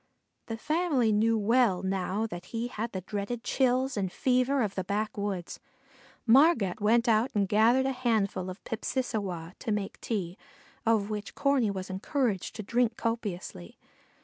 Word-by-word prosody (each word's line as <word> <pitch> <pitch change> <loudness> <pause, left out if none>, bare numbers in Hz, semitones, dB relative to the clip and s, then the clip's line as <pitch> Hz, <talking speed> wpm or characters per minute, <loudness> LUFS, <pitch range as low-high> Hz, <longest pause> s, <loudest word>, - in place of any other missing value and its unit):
The 225 - -4
family 300 -4 +1
knew 225 +2 +3
well 215 -3 +3
now 190 +2 -1
that 175 -5 -7
he 230 +5 -4
had 230 -1 -4
the 190 - -4
dreaded 205 +5 -4
chills 260 0 +1
and 190 -3 -1
fever 255 +3 +2
of 200 -2 -2
the 190 - -2
backwoods. 200 -2 -3 0.7
Margat 235 - +4
went 230 +3 +3
out 225 +2 +3
and 200 -2 +2
gathered 230 +6 +4
a 270 -1 0
lapful 200 -6 +1
of 185 +3 -9
pipsissewa 210 -8 -3
to 225 - -3
make 205 -2 -3
tea, 190 -5 -3 0.5
of 220 -2 +2
which 210 -1 -5
Corney 275 -6 +2
was 190 -1 -4
encouraged 205 +1 -1
to 215 - -5
drink 235 +2 +1
copiously. 200 - -4
220 Hz, 150 wpm, -29 LUFS, 195-245 Hz, 0.7 s, Margat